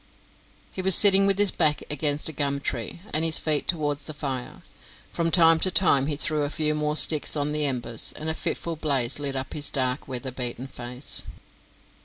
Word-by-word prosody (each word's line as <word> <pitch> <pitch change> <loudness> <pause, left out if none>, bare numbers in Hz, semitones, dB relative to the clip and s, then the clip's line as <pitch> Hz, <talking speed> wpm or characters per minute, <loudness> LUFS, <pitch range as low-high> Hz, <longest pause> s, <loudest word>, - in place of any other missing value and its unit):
He 190 - -4
was 190 0 +5
sitting 195 -1 +6
with 195 -1 +3
his 205 -2 +4
back 150 -1 +1
against 150 0 0
a 160 - -1
gum 140 -1 -1
tree, 130 +4 -5
and 155 - +1
his 165 -1 +3
feet 150 -2 0
towards 145 -4 -1
the 155 - -7
fire. 135 -4 -6 0.5
From 165 0 -1
time 165 -1 +4
to 185 - 0
time 150 -7 +3
he 150 - -2
threw 150 +1 -1
a 145 - -1
few 155 0 -1
more 150 0 -1
sticks 155 -1 +4
on 145 0 -2
the 150 0 -1
embers, 120 -4 -2
and 155 - -5
a 160 - +1
fitful 165 +1 -3
blaze 140 -5 -1
lit 140 -2 -4
up 130 0 -5
his 145 -1 -1
dark 130 -1 -1
weatherbeaten 125 -1 -4
face. 125 +2 -5
150 Hz, 195 wpm, -24 LUFS, 135-160 Hz, 0.5 s, sitting